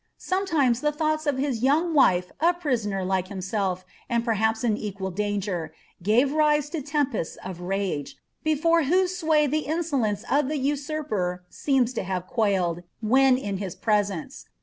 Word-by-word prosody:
Sonietimo* 315 -11 +1
ifH> 300 0 0
llioughu 310 0 0
of 285 -2 +1
his 265 -4 -1
young 310 +6 +2
wife 180 - +4
a 340 +3 +3
prisoner 225 - -1
like 185 -1 0
himself, 190 -1 -2 0.2
and 235 -1 0
perhaps 220 0 +1
is 235 - +2
a«}iHl 200 -3 -4
danger, 200 -4 -2 0.3
gave 230 +9 +3
rise 300 -1 +2
to 325 -3 -3
tempests 280 - -1
nf 185 -2 -5
rage, 185 -5 -2 0.3
before 320 +1 +2
whose 365 +4 +2
sway 315 -4 +3
the 300 +2 -1
ineo^ 315 -3 0
lance 210 -1 -1
of 285 +1 +1
the 305 - -1
nsurper 275 - -2
seems 260 -3 +1
to - - -2
have 185 -1 -3
quailed, 185 -6 0 0.2
when 255 +3 +4
in 205 -6 -3
his 190 -3 -5
presence. 205 -6 -1
240 Hz, 160 wpm, -25 LUFS, 195-300 Hz, 0.3 s, wife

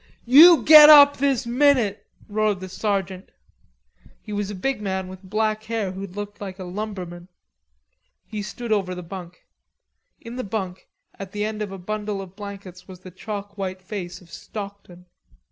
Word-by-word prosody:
"You 315 +7 +8
get 305 -1 +10
up 285 -1 +9
this 275 -3 0
minute," 245 -4 +2 0.2
roared 210 -2 0
the 185 0 -8
sergeant. 190 -1 -3 0.9
He 210 - -8
was 205 -1 -3
a 205 - -6
big 265 +5 -2
man 190 -2 -3
with 185 0 -11
black 215 +2 -2
hair 220 -4 -3
who 195 +1 -7
looked 205 +2 -8
like 190 -2 -7
a 190 - -7
lumberman. 180 -2 -7 1.0
He 215 -1 -6
stood 220 +3 -7
over 190 -4 0
the 180 - -7
bunk. 180 0 -10 0.7
In 235 +1 -9
the 255 - -3
bunk 190 -3 -5 0.3
at 195 -1 -8
the 210 0 -2
end 215 0 -4
of 205 -2 -4
a 195 - -7
bundle 210 +2 -4
of 190 -1 -10
blankets 195 -3 -10
was 185 -1 -12
the 185 - -11
chalk 200 +2 -8
white 185 -1 -5
face 185 -3 -7
of 170 -2 -19
Stockton. 200 -4 -9
200 Hz, 170 wpm, -23 LUFS, 185-215 Hz, 1.0 s, get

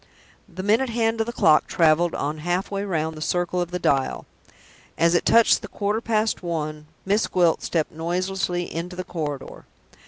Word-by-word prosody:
The 185 +1 -7
minute 225 +6 +2
hand 225 -1 0
of 225 - -1
the - - -2
clock 155 -9 +4
traveled 165 +1 +3
on 150 +2 -3
halfway 185 +4 -2
round 160 -5 -2
the 155 - -9
circle 175 +2 0
of 175 - -3
the 180 - -3
dial. 135 -6 0 0.7
As 170 +1 +3
it 175 - +1
touched 230 0 +5
the - - -7
quarter 210 +2 -2
past 220 -1 0
one, 155 -3 -4 0.2
Miss 205 +3 +1
Gwilt 175 -3 +2
stepped 160 -3 -1
noiselessly 175 +2 -2
into 175 +2 -5
the 185 - -4
corridor. 150 -7 -6
175 Hz, 175 wpm, -23 LUFS, 160-200 Hz, 0.7 s, touched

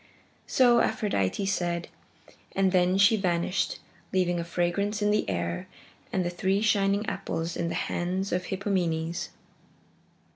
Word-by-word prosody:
So 245 -2 +5
Aphrodite 200 - 0
said, 175 -3 -1 0.7
and 190 -1 +3
then 180 0 +3
she 200 +3 +5
vanished, 180 -1 0 0.3
leaving 175 -2 +1
a - - -1
fragrance 175 +5 -1
in 205 - +3
the 210 - +1
air 85 -2 -2 0.4
and 185 -2 0
the 175 - -1
three 190 +3 +1
shining 200 -1 +2
apples 165 -5 -3
in 170 -1 -1
the - - -3
hands 185 +3 -2
of 180 0 -1
Hippomenes. 175 -4 -1
185 Hz, 135 wpm, -27 LUFS, 170-200 Hz, 0.7 s, So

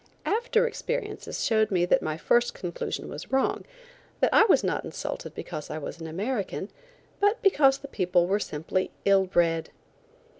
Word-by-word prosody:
After 470 +2 +2
experiences 480 +1 -3
showed 220 -4 +3
me 180 -3 +2
that - - +3
my 155 0 -3
first 240 +7 +2
conclusion 175 -2 -4
was - - -8
wrong; 265 0 +1 0.5
that - - +2
I - - +7
was 420 - +4
not - - -1
insulted - - -6
because 150 - -6
I 155 - -4
was 155 +2 -7
an 160 - -5
American, 200 +3 -3 0.5
but 410 +3 +3
because 280 -9 +5
the 280 - -10
people 180 -7 +1
were 195 +3 +1
simply 175 +1 -2 0.2
ill 195 -1 +4
bred. 165 -3 +1
200 Hz, 160 wpm, -27 LUFS, 175-280 Hz, 0.5 s, I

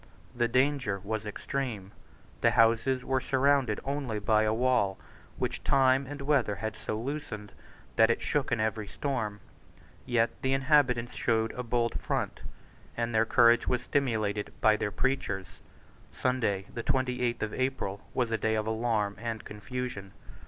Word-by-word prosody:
The 120 -1 +2
danger 130 -4 +1
was 110 +1 -3
extreme. 110 -3 -4 0.5
The - - +5
houses 115 +3 +3
were 130 -1 +1
surrounded 135 -4 +2
only 135 -5 -2
by 105 +1 +3
a 110 - +2
wall 120 -4 +2 0.4
which - - -3
time 135 0 +3
and 145 0 -6
weather 135 -8 +2
had 110 +2 -4
so 110 - -4
loosened 115 -6 -5 0.5
that 110 0 +6
it 115 - +2
shook 145 -3 -1
in 120 - +1
every 110 -1 -1
storm. 110 -8 -3 0.7
Yet 120 -1 +2
the 130 0 +1
inhabitants 130 -4 +3
showed 115 -1 +1
a 125 - -5
bold 120 -1 0
front; - - -2 0.6
and 115 0 -1
their 110 0 +3
courage 120 -1 +5
was 125 -1 0
stimulated 110 -7 0
by 110 0 +5
their 105 - -1
preachers. 105 -6 -2 0.5
Sunday 110 -7 0
the 120 - -3
twenty 125 -1 0
eighth 120 -2 0
of 110 - -3
April 130 -7 -2
was 120 -3 0
a 115 - 0
day 110 0 +1
of 110 -1 -1
alarm 110 -2 0
and 115 -2 -4
confusion. 105 -2 -6
120 Hz, 155 wpm, -29 LUFS, 110-130 Hz, 0.7 s, that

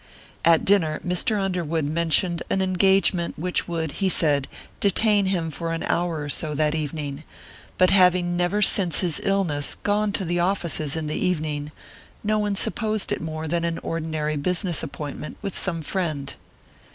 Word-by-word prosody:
At 165 -1 +4
dinner 165 -6 +2
Mr. 180 +4 +1
Underwood 170 -5 -1
mentioned 170 +3 +1
an - - +1
engagement 190 -1 +2
which 180 +3 -1
would, 165 -3 -3
he 190 +6 -1
said, 145 -6 +2 0.3
detain 205 0 +3
him 170 -4 -1
for 165 +2 -4
an 165 - -3
hour 170 -3 -1
or 145 - -6
so 150 +1 -1
that 150 0 +1
evening, 150 -1 -4 0.5
but 185 0 +4
having 180 -2 +4
never 180 +4 +1
since 185 -4 +2
his 175 -5 0
illness 175 -8 +1
gone 205 0 0
to 195 - -1
the 175 +1 -1
offices 170 -5 0
in 160 -1 -3
the 150 +4 -2
evening, 155 -4 -2 0.5
no 215 0 +1
one 205 -1 -1
supposed 215 +1 +2
it - - -2
more 160 0 -5
than 170 +2 -1
an 170 -1 -1
ordinary 155 -2 -2
business 175 +3 0
appointment 150 -1 -7
with 195 - -4
some 165 -4 0
friend. 155 -6 -3
170 Hz, 165 wpm, -24 LUFS, 155-190 Hz, 0.5 s, At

